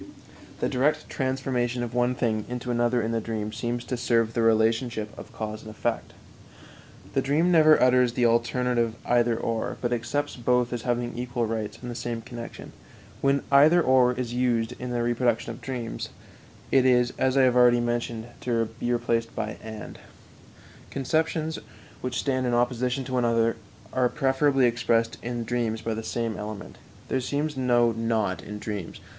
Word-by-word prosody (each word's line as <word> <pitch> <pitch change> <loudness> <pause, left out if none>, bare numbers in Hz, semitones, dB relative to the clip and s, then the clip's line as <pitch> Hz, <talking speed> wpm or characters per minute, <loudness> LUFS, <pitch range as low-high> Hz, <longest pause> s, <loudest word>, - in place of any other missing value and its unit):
The - - +2
direct 140 +4 0
transformation 130 -2 -1
of 120 -1 -5
one 125 +1 +1
thing 110 -4 0
into 125 0 -3
another 120 0 +1
in 110 - -1
the 115 -1 0
dream 110 -1 -4
seems 120 0 -3
to 125 - -2
serve 115 -2 +1
the 120 - 0
relationship 115 0 +1
of - - -11
cause 110 0 -5
and 110 - -10
effect. 110 - -3 1.0
The - - +2
dream 155 +6 +2
never 155 -2 +6
utters 125 -1 +4
the 120 -1 +2
alternative 120 0 +1
"either 120 -1 +2
or," 115 -1 -2
but 120 0 -1
accepts 120 +5 -2
both 125 0 +1
as 120 - -3
having 120 0 -1
equal 120 -1 -2
rights 110 -1 -3
in - - -5
the 120 - -4
same 115 -1 -4
connection. 120 -1 -9 0.5
When 140 0 +2
"either 150 +5 +7
or" 130 -5 +4
is 125 -1 -4
used 120 -2 +1
in 125 - -5
the 120 -1 -1
reproduction 120 -1 0
of 115 - -10
dreams, 120 -2 -5 0.6
it 135 - +5
is, 125 -1 +3
as 130 +1 +2
I 135 - +6
have 125 -1 +4
already 120 -1 +6
mentioned, 120 -1 -2
to 115 -3 0
be 120 - -1
replaced 115 -1 0
by 110 -1 -3
"and." 110 -1 -8 0.9
Conceptions 160 +3 -1 0.4
which 125 -1 -3
stand 130 -2 0
in 120 - +1
opposition 125 +2 0
to 130 0 -7
one 125 -1 +2
another 115 -1 +2 0.4
are 125 -1 +2
preferably 135 0 +2
expressed 115 -1 +1
in 120 0 -3
dreams 115 -1 -1
by 115 - -3
the 110 - -4
same 115 0 -3
element. 105 -1 -7 0.3
There 130 - 0
seems 145 +3 -2
no 120 -2 +3
"not" 110 -4 -1
in 105 - -7
dreams. 105 -4 -5
120 Hz, 175 wpm, -26 LUFS, 115-125 Hz, 1.0 s, either